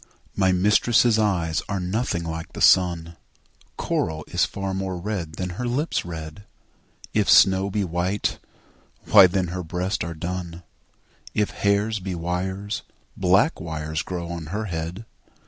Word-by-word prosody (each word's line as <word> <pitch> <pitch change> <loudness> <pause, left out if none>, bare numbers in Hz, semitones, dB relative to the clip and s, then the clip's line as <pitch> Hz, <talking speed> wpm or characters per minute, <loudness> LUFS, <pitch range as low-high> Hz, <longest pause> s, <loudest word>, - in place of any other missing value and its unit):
MY 95 -1 +3
mistress' 110 +4 +4
eyes 85 -7 +1
are 100 -1 -1
nothing 90 -1 -1
like 80 0 -6
the - - -7
sun; 85 -2 +4 0.6
Coral 80 -2 -2
is 90 - +2
far 100 -1 -4
more 95 -1 -3
red 90 -4 -4
than 90 +2 -4
her 125 - -1
lips' 140 +7 -1
red; 80 +3 -8 0.7
If 105 -2 +1
snow 95 +1 +6
be 100 +1 -1
white, 90 +3 -1 0.7
why 95 - +8
then 90 -1 -1
her 90 +1 -4
breasts 90 +3 -2
are 85 -1 -5
dun; 85 0 -5 0.7
If 105 -1 +1
hairs 100 +2 +1
be 95 -1 -4
wires, 95 +4 -3 0.3
black 95 - +3
wires 80 -1 -3
grow 85 -2 -5
on 85 -3 -6
her 105 +6 -3
head. 85 +3 -5
90 Hz, 145 wpm, -24 LUFS, 85-100 Hz, 0.7 s, why